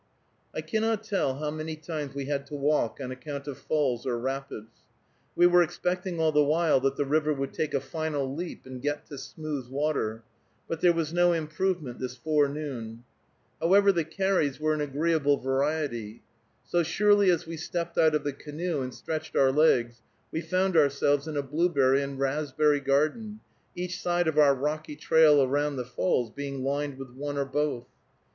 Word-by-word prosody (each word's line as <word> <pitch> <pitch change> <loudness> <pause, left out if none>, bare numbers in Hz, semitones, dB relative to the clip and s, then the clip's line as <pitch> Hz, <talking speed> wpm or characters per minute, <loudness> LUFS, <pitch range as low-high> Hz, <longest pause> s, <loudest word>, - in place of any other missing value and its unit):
I - - -2
cannot 220 -1 -1
tell 195 -11 0
how 150 0 -3
many 155 +1 -5
times 155 -3 -6
we 140 -1 -3
had 140 0 -2
to 145 - -7
walk 145 -5 0
on 130 -2 -5
account 140 +2 -7
of 140 - -6
falls 135 -6 0
or 125 -2 -1
rapids. 130 -3 -5 0.6
We 175 - +5
were 175 0 +6
expecting 180 +1 -2
all 160 -1 +3
the 150 -1 +4
while 155 0 +3
that 135 +1 0
the 145 - -1
river 155 +2 +1
would 135 0 -4
take 155 - -2
a - - +2
final 140 -1 -3
leap 170 +4 -6
and 130 -1 -8
get 145 +2 -2
to 140 -3 -7
smooth 145 -2 -6
water, 135 -5 -2 0.4
but 165 - -4
there 175 - +6
was 165 -2 -2
no 175 0 +4
improvement 160 -3 -2
this 130 0 -5
forenoon. 140 -5 -1 0.6
However, 200 +4 +5
the 170 -3 0
carries 165 -4 0
were 155 0 +1
an 155 - -2
agreeable 145 0 +1
variety. 135 -5 -2 0.4
So 175 - +1
surely 205 +4 +3
as 175 -3 +2
we 165 0 -6
stepped 170 +1 -4
out 160 -1 +5
of 150 - 0
the 145 - -2
canoe 150 +2 -4
and 130 0 -4
stretched 160 -1 -5
our 135 -1 +4
legs 120 -6 +2 0.3
we 160 - -2
found 185 +1 0
ourselves 145 -1 +3
in 155 -2 -4
a 145 - 0
blueberry 140 -2 +2
and 140 -1 -4
raspberry 145 +1 +1
garden, 155 +11 0 0.4
each 180 +1 -4
side 175 -1 +1
of 155 -1 +2
our 140 -2 +6
rocky 150 +2 -3
trail 150 -2 +5
around 145 +2 0
the 125 -2 -3
falls 125 -2 0
being 140 -1 -5
lined 140 0 -2
with 135 -2 -9
one 145 +3 -5
or 140 - 0
both. 145 -3 -1
150 Hz, 180 wpm, -27 LUFS, 135-160 Hz, 0.6 s, were